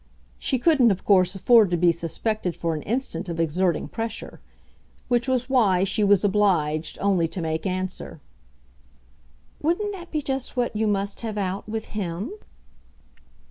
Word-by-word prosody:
She 260 - 0
couldn't 265 -3 +4
of 195 -3 -1
course 185 -2 +4
afford 220 +1 +5
to 175 - +1
be 175 0 +4
suspected 175 +3 -2
for 165 -1 -2
an 155 - -4
instant 205 - -3
of 165 -1 -4
exerting 170 +2 0
pressure; 225 -1 -6 0.7
which 240 +1 +1
was 255 -1 0
why 210 -9 +3
she 195 +2 +1
was 200 0 +4
obliged 175 -7 +1
only 190 -4 +2
to 185 - -6
make 160 +2 -2
answer: 185 -3 -4 1.4
"Wouldn't 380 +7 0
that 350 -3 -9
be 305 -2 -2
just 270 -1 -3
what 240 -3 0
you 220 +1 +1
must 200 -1 -1
have 220 -2 -4
out 195 +1 -3
with 220 0 -3
HIM?" 195 - -3
200 Hz, 155 wpm, -24 LUFS, 180-235 Hz, 1.4 s, afford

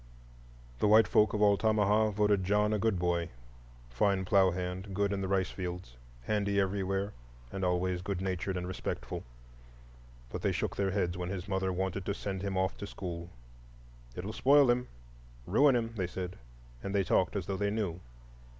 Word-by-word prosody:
The - - +3
white 110 +2 +6
folk 105 -1 +4
of 105 - +2
Altamaha 105 +1 +3
voted 105 -1 +2
John 105 +3 +2
a 105 - +1
good 110 -2 +1
boy,—fine - - -2
plough 95 0 +5
hand, 90 +2 -4
good 100 0 +1
in 100 - -2
the 95 - -2
rice 95 -1 +1
fields, 90 -8 -6 0.3
handy 100 - 0
everywhere, 95 +1 -1 0.4
and 95 - -4
always 90 0 0
good 95 -1 -3
natured 95 0 -2
and 90 0 -4
respectful. 95 - -4 1.1
But - - -4
they - - +1
shook - - -2
their 100 -1 0
heads 90 -3 -1
when 90 0 -3
his 95 0 -5
mother 95 -1 0
wanted 95 +1 -2
to 100 - 0
send 95 -3 -4
him 100 -1 -2
off 95 0 0
to 100 - -6
school. 85 -3 -6 0.9
"It'll 100 +4 -5
spoil 140 +1 +5
him,—ruin - - 0
him," 115 -1 -1
they 95 -4 -1
said; 90 0 -6 0.4
and 100 +1 -4
they 100 - +3
talked 90 +1 +1
as 95 -4 -2
though 95 - -3
they 100 +1 0
knew. 100 -5 -2
95 Hz, 170 wpm, -31 LUFS, 90-100 Hz, 1.1 s, white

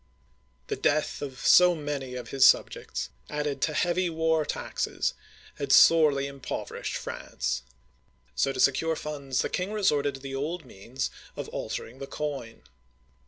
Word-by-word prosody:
The - - -2
death 150 +1 0
of 135 -3 -6
so 180 -1 +7
many 145 -4 -4
of 125 - -6
his 135 -1 +2
subjects, - - +3 0.2
added 150 -1 -2
to 155 - +1
heavy 175 +2 +1
war 160 -1 +1
taxes, - - -2 0.4
had 140 -2 -2
sorely 150 -4 +6
impoverished 140 -2 -5
France; 65 0 -3 0.7
so, 135 - +1
to - - -6
secure 160 +4 +3
funds, 140 -4 -2
the - - 0
king 180 +3 -2
resorted 145 -10 +1
to - - -9
the 135 0 -6
old 155 +4 -3
means 125 +4 -5 0.2
of - - -5
altering 125 +3 -5
the 135 - -6
coin. 140 - -5
145 Hz, 145 wpm, -28 LUFS, 135-160 Hz, 0.7 s, so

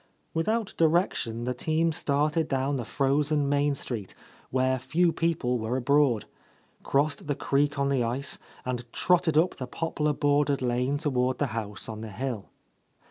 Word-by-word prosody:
Without 215 +6 0
direction 160 - +1
the 125 +1 -1
team 160 +5 +1
started 150 0 0
down 135 +1 0
the 125 - -3
frozen 145 +2 +1
main 145 0 +2
street, 115 -8 -5 0.3
where 130 0 +1
few 165 +7 +2
people 155 -7 0
were 110 +3 -1
abroad, 130 -3 +3 0.6
crossed 145 +2 0
the 145 - 0
creek 145 +1 +1
on 140 0 +1
the 135 -3 +2
ice, 125 +4 -2 0.3
and 125 -2 -4
trotted 170 -4 +2
up 170 +4 +3
the 130 - -5
poplar 150 +1 -1
bordered 145 -1 +2
lane 125 +3 +1
toward 130 -4 0
the 145 - +1
house 105 -3 -3
on 110 -1 -6
the 110 - -6
hill. 115 0 -4
140 Hz, 155 wpm, -27 LUFS, 125-150 Hz, 0.6 s, abroad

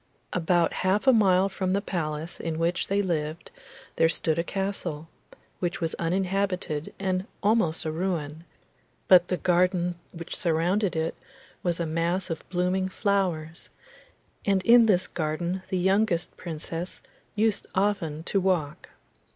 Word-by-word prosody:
About 175 -1 +2
half 190 +5 +1
a 265 - +7
mile 195 -4 +4
from 190 -1 -2
the 200 - +2
palace 160 -4 -3
in 165 -1 -3
which 170 +2 0
they 200 +1 +1
lived 160 -2 -3 0.5
there 165 - +4
stood 165 -1 0
a - - +1
castle, 175 -5 -3 0.5
which 175 -1 -2
was 165 -1 -1
uninhabited 180 -3 -1
and 190 0 -1 0.2
almost 200 -7 +2
a 155 - -1
ruin, 160 -3 -3 0.6
but 180 -2 +7
the 180 - -1
garden 180 0 +2 0.2
which 170 -1 -7
surrounded 180 +3 +1
it 160 0 -1 0.5
was 175 -1 -1
a 170 - 0
mass 170 +3 -1
of 160 - -6
blooming 185 +1 0
flowers, 185 -6 -1 0.7
and 195 -2 +2
in 235 +1 +7
this 185 -3 +3
garden 170 +3 -2
the 190 - 0
youngest 190 -1 +1
Princess 165 +1 -5 0.3
used 215 0 +1
often 190 -6 0
to 195 +3 0
walk. 170 -6 -1
180 Hz, 140 wpm, -27 LUFS, 165-190 Hz, 0.7 s, a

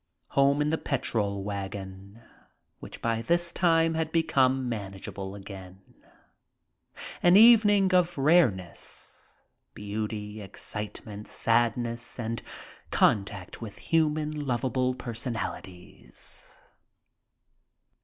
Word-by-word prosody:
Home 140 +1 +3
in 150 - 0
the 160 - 0
petrol 105 -7 -1
wagon, 100 +1 -7 0.6
which - - -9
by 115 -1 0
this 170 +7 +1
time 165 -2 +3
had 160 -1 -2
become, 135 -5 +2
manageable 100 -3 -6
again. 95 -2 -10 1.4
An 175 +2 +6
evening 205 -4 +6
of 175 -2 +3
rareness. 135 - +1 0.5
Beauty, 105 0 -5
excite 105 +1 -6
ment, 105 -1 -8
sadness 115 0 0
and 115 0 -3 0.5
contact 100 -1 +1
with 110 -3 -8
human, 155 -2 0
lovable 130 +1 0
personalities. 115 - -7
115 Hz, 90 wpm, -28 LUFS, 100-150 Hz, 1.4 s, An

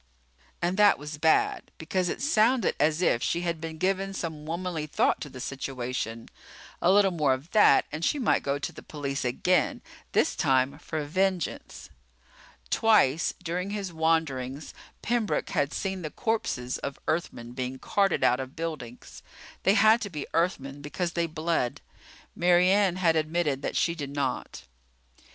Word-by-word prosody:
And 180 +2 0
that 210 -1 +6
was 150 +1 -8
bad 160 +1 +2
because 180 +2 -1
it - - -4
sounded 240 - +3
as 155 +3 +2
if 120 - +2
she 170 - 0
had 170 -2 -2
been 160 -1 -6
giving 195 +2 0
some 160 -5 -5
womanly 170 -2 -3
thought - - +1
to 145 - -5
the 130 - -10
situation. 125 -4 -4 0.5
A 180 - +4
little 200 -1 +5
more 150 -6 +2
of 140 +7 -12
that 210 -10 +5
and 155 +3 -5
she 295 - +2
might 250 -6 +2
go 140 0 -1
to 145 - -4
the - - -11
police 140 -2 -4
again, 155 +9 +1 0.3
this - - +2
time 135 -3 +1
for 155 -2 -4
vengeance. 185 +2 -2 0.8
Twice 175 -9 +3
during 180 +2 -2
his 200 -3 -4
wanderings 160 -4 -1 0.3
Pembroke 235 -2 0
had 140 +1 0
seen 190 -1 -3
the 155 - -4
corpses 140 - -2
of 140 - -5
Earthmen 120 -8 -2
being 130 +1 -4
carted 195 +8 +1
out 125 - +4
of 130 0 -6
buildings. 150 -8 -7 0.4
They 195 - +3
had 220 +1 +5
to 200 - -3
be 150 -5 -5
Earthmen 145 -5 -1
because 170 +4 -3
they 170 -1 0
bled. 160 -5 -1 0.6
Mary 175 +1 +4
Ann 195 -3 +3
had 170 -3 +2
admitted 155 -3 0
that - - -3
she 170 - +2
did 145 -4 -5
not. 140 - -3
160 Hz, 160 wpm, -27 LUFS, 140-185 Hz, 0.8 s, that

